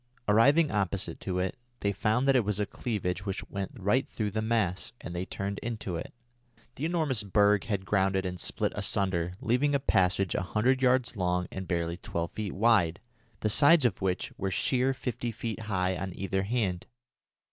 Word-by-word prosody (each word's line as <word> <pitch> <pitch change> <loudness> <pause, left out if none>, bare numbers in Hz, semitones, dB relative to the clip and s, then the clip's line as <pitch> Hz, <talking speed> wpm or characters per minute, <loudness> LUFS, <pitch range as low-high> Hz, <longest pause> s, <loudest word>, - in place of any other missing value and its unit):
Arriving 140 +9 +5
opposite 100 -1 -2
to 90 -2 -3
it, 95 +5 -1 0.3
they 100 - +1
found 110 +6 +1
that 135 - +5
it 125 - +4
was 105 0 -1
a 105 - +1
cleavage 100 -5 -3
which 100 -1 -4
went 100 -1 -3
right 120 +4 +1
through 105 -2 -2
the 110 - -1
mass, 110 -5 0
and 85 - -7
they 90 +1 -2
turned 100 +1 -4
into 110 -6 -4
it. 85 - -5 0.6
The 140 - -4
enormous 155 -9 +1
berg 105 0 +3
had 100 -3 -2
grounded 95 -1 +1
and 90 - -2
had 90 - -8
split - - -1
asunder, 90 -3 0
leaving 140 +5 +2
a - - +3
passage 95 -6 +2
a - - 0
hundred 120 +8 +1
yards 130 -1 +2
long 90 -2 0
and 95 -1 -6
barely 85 -1 -1
twelve 85 -1 -4
feet 105 -3 -4
wide, 100 -6 +3 0.4
the 110 - +1
sides 145 +4 +6
of 105 -5 +1
which 95 -1 -1
were 95 - -1
sheer 130 +7 +1
fifty 120 -1 -3
feet 115 0 -5
high 95 -2 +1
on 95 +1 -5
either 95 0 -1
hand. 100 -4 -1
100 Hz, 190 wpm, -29 LUFS, 95-120 Hz, 0.6 s, sides